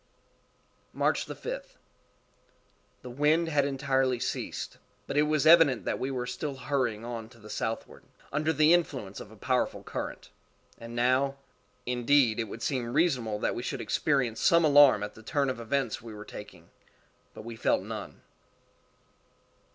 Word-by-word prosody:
_ -, -, -12 dB
_March_5th. -, -, -2 dB, 1.3 s
The 125 Hz, -, -8 dB
wind 155 Hz, +5 st, +2 dB
had 145 Hz, -3 st, +2 dB
entirely 135 Hz, -2 st, 0 dB
ceased, -, -, -4 dB, 0.3 s
but -, -, -5 dB
it 145 Hz, -, +5 dB
was 155 Hz, -1 st, +1 dB
evident 160 Hz, -6 st, +6 dB
that -, -, -1 dB
we 130 Hz, -, -2 dB
were 125 Hz, -2 st, -3 dB
still 135 Hz, +3 st, -4 dB
hurrying 125 Hz, -4 st, -2 dB
on 115 Hz, -2 st, -6 dB
to 120 Hz, -, -18 dB
the 105 Hz, -1 st, -12 dB
southward, 110 Hz, 0 st, -4 dB, 0.3 s
under 155 Hz, +2 st, +1 dB
the 155 Hz, +2 st, +5 dB
influence 130 Hz, -, -1 dB
of -, -, -10 dB
a 110 Hz, -, -14 dB
powerful 125 Hz, +4 st, -1 dB
current. -, -, -6 dB, 0.5 s
And 115 Hz, 0 st, -9 dB
now,—indeed, 125 Hz, -1 st, 0 dB
it 115 Hz, -, 0 dB
would 110 Hz, +2 st, -8 dB
seem 125 Hz, -4 st, -1 dB
reasonable 125 Hz, -10 st, +1 dB
that -, -, 0 dB
we -, -, -4 dB
should 125 Hz, -, -3 dB
experience 125 Hz, -6 st, 0 dB
some 170 Hz, -1 st, +5 dB
alarm 145 Hz, -7 st, +6 dB
at 105 Hz, -, -5 dB
the 110 Hz, -, -14 dB
turn 140 Hz, +3 st, 0 dB
events 120 Hz, 0 st, -2 dB
were 105 Hz, -2 st, -9 dB
taking—but 90 Hz, +2 st, -14 dB
we 115 Hz, 0 st, -7 dB
felt -, -, +1 dB
none. -, -, -8 dB
130 Hz, 145 wpm, -29 LUFS, 115-145 Hz, 1.3 s, evident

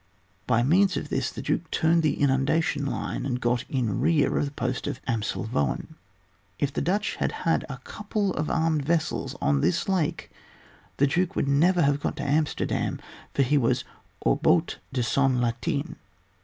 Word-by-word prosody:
By 120 Hz, -1 st, +3 dB
means 180 Hz, +7 st, +3 dB
of -, -, -4 dB
this, -, -, 0 dB
the -, -, -7 dB
Duke -, -, -1 dB
turned 165 Hz, +1 st, +3 dB
the 155 Hz, -2 st, 0 dB
inundation 140 Hz, +2 st, +1 dB
line, -, -, -3 dB
and 125 Hz, -2 st, -2 dB
got 120 Hz, 0 st, 0 dB
in 120 Hz, -7 st, -1 dB
rear 160 Hz, -4 st, +2 dB
of -, -, +1 dB
the 140 Hz, -, -5 dB
post 125 Hz, -2 st, -3 dB
of 130 Hz, -, -3 dB
Amselvoen. 110 Hz, -, -1 dB, 0.6 s
If 140 Hz, -1 st, -1 dB
the -, -, -1 dB
Dutch 200 Hz, +7 st, 0 dB
had -, -, 0 dB
had 165 Hz, -, +2 dB
a 135 Hz, -, -5 dB
couple 210 Hz, -2 st, -2 dB
of 150 Hz, +1 st, -2 dB
armed 160 Hz, -2 st, +1 dB
vessels 160 Hz, +2 st, -1 dB
on 70 Hz, -1 st, +2 dB
this 85 Hz, -, +1 dB
lake 185 Hz, -6 st, -1 dB, 0.7 s
the 140 Hz, -, +4 dB
duke 175 Hz, +6 st, 0 dB
would -, -, 0 dB
never 170 Hz, +6 st, +4 dB
have 140 Hz, 0 st, +2 dB
got -, -, -2 dB
to 140 Hz, -, -5 dB
Amsterdam, 150 Hz, +2 st, 0 dB, 0.4 s
for 140 Hz, -, +4 dB
he 145 Hz, +3 st, +3 dB
was 115 Hz, -, +1 dB, 0.4 s
au -, -, +3 dB
hout -, -, +2 dB
de 125 Hz, -2 st, 0 dB
son 135 Hz, +1 st, +2 dB
latin. 140 Hz, +6 st, -2 dB
140 Hz, 175 wpm, -26 LUFS, 125-165 Hz, 0.7 s, the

